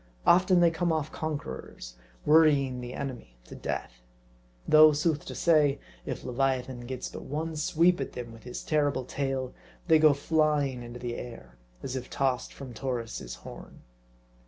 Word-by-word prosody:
Often 180 Hz, 0 st, +5 dB
they 170 Hz, -1 st, +5 dB
come 170 Hz, +1 st, 0 dB
off 155 Hz, -2 st, -1 dB
conquerors, 65 Hz, -, -6 dB, 0.3 s
worrying 145 Hz, -5 st, +4 dB
the 125 Hz, 0 st, -7 dB
enemy 120 Hz, -, -6 dB
to -, -, -13 dB
death. -, -, -5 dB, 0.7 s
Though, 155 Hz, 0 st, +8 dB
sooth 150 Hz, 0 st, 0 dB
to -, -, -7 dB
say, 150 Hz, -4 st, +3 dB, 0.3 s
if -, -, -4 dB
leviathan 130 Hz, -1 st, -1 dB
gets 130 Hz, 0 st, -4 dB
but -, -, -8 dB
one 160 Hz, +3 st, -4 dB
sweep 170 Hz, +1 st, +2 dB
at 135 Hz, -, -4 dB
them 120 Hz, -2 st, -7 dB
with 115 Hz, -, -13 dB
his 125 Hz, +2 st, -7 dB
terrible 145 Hz, -4 st, +1 dB
tail, 135 Hz, -1 st, -3 dB, 0.3 s
they 160 Hz, -2 st, +6 dB
go 155 Hz, -2 st, +6 dB
flying 145 Hz, -3 st, +1 dB
into 120 Hz, 0 st, -8 dB
the 120 Hz, -1 st, -4 dB
air, 115 Hz, -, -9 dB, 0.3 s
as 130 Hz, -, -4 dB
if 125 Hz, -1 st, -5 dB
tossed 130 Hz, -2 st, -1 dB
from 135 Hz, -3 st, -9 dB
Taurus' 115 Hz, -, -4 dB
horn. -, -, -11 dB
135 Hz, 160 wpm, -28 LUFS, 125-155 Hz, 0.7 s, Though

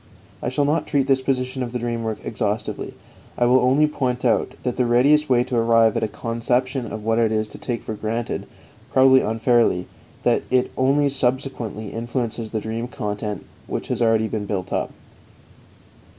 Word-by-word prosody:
I -, -, -1 dB
shall 140 Hz, +3 st, +1 dB
not 150 Hz, +3 st, 0 dB
treat 140 Hz, -3 st, +1 dB
this 135 Hz, -1 st, +2 dB
position 130 Hz, 0 st, -1 dB
of 120 Hz, -1 st, -4 dB
the -, -, 0 dB
dream 120 Hz, -1 st, -2 dB
work 110 Hz, -2 st, -2 dB
exhaustively; 105 Hz, -1 st, -3 dB, 0.4 s
I 120 Hz, -, +3 dB
will 125 Hz, +2 st, +5 dB
only 135 Hz, +4 st, +4 dB
point 130 Hz, -4 st, -2 dB
out 115 Hz, -, +2 dB
that 125 Hz, -, -1 dB
the 125 Hz, -, +1 dB
readiest 145 Hz, +6 st, +4 dB
way 120 Hz, -1 st, +4 dB
to 125 Hz, 0 st, -4 dB
arrive 115 Hz, -1 st, +4 dB
at -, -, 0 dB
a 110 Hz, -, +1 dB
conception 120 Hz, +4 st, -1 dB
of 110 Hz, -1 st, -7 dB
it 115 Hz, 0 st, +2 dB
is 110 Hz, 0 st, 0 dB
to -, -, -11 dB
take 120 Hz, -3 st, -3 dB
for 110 Hz, -, -4 dB
granted, 110 Hz, +2 st, -3 dB, 0.4 s
probably 130 Hz, 0 st, +6 dB
unfairly, 115 Hz, -4 st, +2 dB, 0.4 s
that -, -, +3 dB
it 130 Hz, 0 st, +2 dB
only 140 Hz, +2 st, +3 dB
subsequently 125 Hz, -5 st, -2 dB
influences 115 Hz, -1 st, -3 dB
the 110 Hz, -, -2 dB
dream 115 Hz, +2 st, -3 dB
content 105 Hz, -3 st, -4 dB, 0.2 s
which -, -, -4 dB
has -, -, -1 dB
already 115 Hz, -1 st, +3 dB
been 105 Hz, -2 st, -4 dB
built 95 Hz, -3 st, -3 dB
up. -, -, -1 dB
120 Hz, 180 wpm, -22 LUFS, 110-130 Hz, 0.4 s, probably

